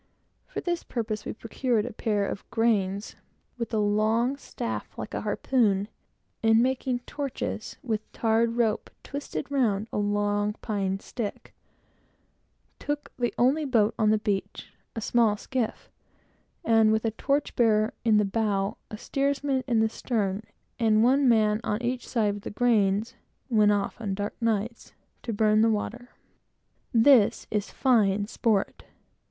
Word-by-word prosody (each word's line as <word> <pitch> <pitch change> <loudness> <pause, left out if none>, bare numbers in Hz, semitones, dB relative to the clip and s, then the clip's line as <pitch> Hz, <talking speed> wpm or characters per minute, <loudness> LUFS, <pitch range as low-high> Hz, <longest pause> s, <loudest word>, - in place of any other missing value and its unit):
For - - -5
this 345 -1 -1
purpose, 220 -3 -4
we - - -4
procured 230 0 -1
a 245 - -6
pair 210 -2 0
of 200 - -6
grains, 205 -3 0 0.4
with 235 - -3
a 220 - 0
long 215 +5 +2
staff - - -6
like - - -6
a - - -2
harpoon, 210 -6 +1 0.5
and 225 0 +5
making 255 -1 -1
torches 270 -5 -5
with 220 -3 -3
tarred 230 0 +1
rope 225 -3 +1
twisted 285 0 -5
round 220 -7 +1
a - - 0
long 205 0 0
pine 195 -3 -2
stick, 215 0 -6 1.3
took 290 0 -4
the 240 -1 +1
only 270 +6 +3
boat 230 -7 +2
on 215 -1 +4
the 215 - +4
beach, 205 -2 -3 0.2
a 225 - -3
small 220 -1 +2
skiff, 250 0 -3 0.7
and 225 -1 +5
with 220 +1 +1
a 225 - +1
torch 280 +6 -1
bearer 215 -2 +3
in 220 -2 +4
the 210 - +3
bow, 200 -1 -1
a 215 - -7
steersman 275 +1 -1
in 230 -3 +2
the 220 - +3
stern, 210 -4 -2 0.4
and 220 -2 +4
one 265 +2 +4
man 215 -2 +3
on 210 -1 -1
each 245 +1 -2
side 215 -4 +1
with 205 0 -8
the - - -5
grains, 215 0 +2 0.4
went 210 -2 +5
off, 205 +3 -1
on 200 -3 -2
dark 205 +1 -3
nights, 230 0 -2 0.3
to 235 - -4
burn 215 0 +3
the 225 - +4
water. 235 +3 -3 0.8
This 235 -2 +5
is 210 -1 -1
fine 210 -6 +2
sport. 210 -2 -1
220 Hz, 150 wpm, -27 LUFS, 210-245 Hz, 1.3 s, and